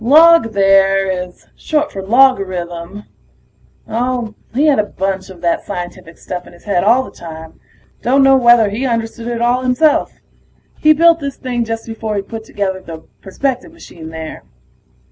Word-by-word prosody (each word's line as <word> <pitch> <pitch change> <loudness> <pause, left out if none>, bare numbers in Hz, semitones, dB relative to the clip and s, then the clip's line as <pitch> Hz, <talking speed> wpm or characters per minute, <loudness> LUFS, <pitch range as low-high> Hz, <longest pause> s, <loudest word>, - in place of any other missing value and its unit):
Log, 310 -2 +6
there, 195 -1 +3
is 180 -1 -5
short 300 -1 -1
for 195 - -6
logarithm. 190 -5 +1 0.8
Oh, 240 -1 -2 0.2
he 275 +6 +1
had 295 -6 +4
a - - +3
bunch 190 -1 -4
of 180 -3 -13
that 170 -1 0
scientific 175 -2 -7
stuff 180 -1 -7
in - - -15
his 175 - -18
head 195 -4 0
all 240 +6 +4
the - - -11
time; 160 -1 -11 0.4
dunno 270 +2 +4
whether 240 -4 +5
he 245 +6 -2
understood 230 -1 -3
it 235 -1 -2
all 245 +1 +2
himself. 255 +4 +2 0.7
He 310 - +5
built 335 +2 +4
this 280 -2 -5
thing 245 -2 -2
just 225 0 -4
before 225 -1 -5
he 200 - -2
put 220 +2 -8
together 190 -3 -3
the 160 -2 -10 0.2
perspective 265 - -3
machine 170 - -12
there. 160 -1 -8
220 Hz, 165 wpm, -16 LUFS, 190-255 Hz, 0.8 s, Log